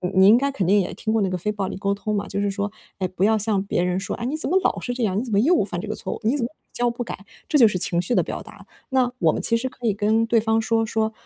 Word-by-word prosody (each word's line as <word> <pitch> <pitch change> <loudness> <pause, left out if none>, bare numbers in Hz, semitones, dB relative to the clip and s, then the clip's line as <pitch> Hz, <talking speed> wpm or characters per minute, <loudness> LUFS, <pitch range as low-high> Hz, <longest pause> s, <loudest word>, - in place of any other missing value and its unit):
你 190 0 +6
应 215 +4 +8
该 280 +3 +1
肯 240 -9 -2
定 200 +4 +4
也 185 - -2
听 220 - -3
过 220 0 +2
那 195 - +2
个 185 - -2
非 210 +5 -2
暴 200 -2 -3
力 - - -5
沟 200 +1 -1
通 210 +1 -3
嘛。 200 - -1
就 200 - -2
是 205 0 0
说， 200 +1 -3 0.3
哎， 190 - 0
不 185 +1 0
要 220 +1 +3
向 210 -2 +1
别 195 -3 -1
人 180 +1 0
说： 195 - -4
“哎， - - -7
你 280 +5 -2
怎 310 - -1
么 365 - +3
老 - - +1
是 245 - -3
这 245 -1 -2
样， 200 -2 +1
你 - - -2
怎 235 -4 -5
么 - - +3
又 335 +8 +4
犯 175 -3 -4
这 - - -6
个 215 - -3
错 - - -4
误， - - -9
你 235 +7 +2
怎 240 - 0
么 - - -2
屡 315 - -24
教 245 0 +1
不 240 +1 -4
改。” 200 -4 -8 0.2
这 300 - +3
就 235 - +8
是 210 - -1
情 175 -1 +1
绪 210 +7 -1
的 - - +3
表 - - -5
达。 - - -14 0.2
那 255 -2 +2
我 - - +3
们 - - -2
其 230 - +2
实 250 +3 -2
可 250 -1 -9
以 220 - +3
跟 215 +2 +2
对 230 0 +3
方 225 0 +1
说 225 0 +1
说 220 0 -1
215 Hz, 375 characters per minute, -23 LUFS, 200-235 Hz, 0.3 s, 应